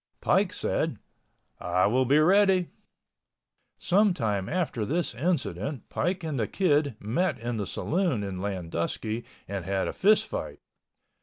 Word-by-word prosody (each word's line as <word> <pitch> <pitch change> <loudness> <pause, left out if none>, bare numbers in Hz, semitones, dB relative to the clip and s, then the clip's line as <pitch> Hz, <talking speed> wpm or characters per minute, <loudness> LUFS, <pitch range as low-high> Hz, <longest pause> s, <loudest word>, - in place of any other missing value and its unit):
Pike - - +2
said, - - -1 0.6
"I 90 +1 +1
will 130 +5 +2
be 140 +4 +4
ready." 185 +2 +4 1.1
Some 200 0 +3
time 105 - -1
after 160 -10 -1
this 165 +9 -1
incident 135 - -2
Pike 180 0 -1
and 155 -5 -2
the 110 - 0
Kid 145 - +1
met 125 - 0
in 120 0 -3
the 100 -3 -3
saloon 170 - 0
in 95 -2 -4
Landusky 100 +4 -3 0.2
and 100 -2 -4
had 95 +1 -1
a - - -3
fist 210 +2 +4
fight. - - -5
130 Hz, 140 wpm, -27 LUFS, -, 1.1 s, be